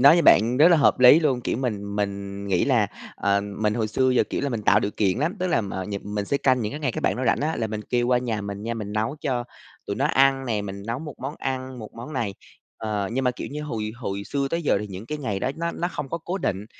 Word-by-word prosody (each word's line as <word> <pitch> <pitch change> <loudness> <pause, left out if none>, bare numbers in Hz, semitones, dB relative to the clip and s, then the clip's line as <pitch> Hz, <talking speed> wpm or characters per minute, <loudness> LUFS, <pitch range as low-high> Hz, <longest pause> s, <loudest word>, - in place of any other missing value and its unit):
nói 140 +5 +8
như 170 - +3
bạn 115 0 +5
rất 155 +4 +7
là 175 - +6
hợp 145 - +4
lý 125 +6 +9
luôn, 135 -6 +1
kiểu, 115 - -1
mình 105 -5 -3
mình 100 -1 -3
nghĩ 95 -3 +2
là, 120 -7 +3 0.3
ờ, 100 0 +2
mình 105 +1 -1
hồi 110 -2 0
xưa 130 +4 +2
giờ, 125 - +3
kiểu - - -1
là, 140 - 0
mình 115 -5 -3
tạo - - +5
điều 100 - -1
kiện 100 0 +2
lắm, 165 +9 0
tức 185 - +1
là, 160 -10 +2
ờ, 95 -1 -3
nhật 100 0 -5
mình 105 0 -3
sẽ 140 - 0
canh 130 -2 +2
những 105 -2 -2
cái 145 - -5
ngày 130 -6 0
các - - -4
bạn - - +1
đó 130 - -2
rảnh 115 - +2
á, 155 +3 0
là 110 - -1
mình 110 0 -4
kêu 120 -1 +2
qua 125 0 +3
nhà 115 -4 -2
mình 100 0 -5
nha, 115 +2 -2
mình 105 -2 -5
nấu 110 +7 -1
cho 125 -3 -1 0.4
tụi 100 - -3
nó 135 - +1
ăn 135 -2 +3
nè, 110 -4 0
mình 100 0 -6
nấu 115 +2 -2
một 150 -2 -7
món 135 +3 -5
ăn 130 -1 -4
một 110 - -9
món 120 +6 -8
này 115 -8 -2 0.4
ờ, 105 -3 -2
nhưng 130 +2 0
mà, 125 - +4
kiểu - - -5
như, 150 +2 -5
hồi 110 -7 -3
hồi 100 -4 -4
xưa 140 +3 -1
tới 170 +1 -1
giờ 145 - +2
thì 105 - -4
những 100 +2 -8
cái 150 - -4
ngày 105 -9 -2
đó - - 0
nó 170 +1 -2
nó 175 - -2
không 150 -5 -5
có 165 - -3
cố 175 +4 -4
định, 100 - -2
120 Hz, 295 wpm, -24 LUFS, 105-135 Hz, 0.4 s, lý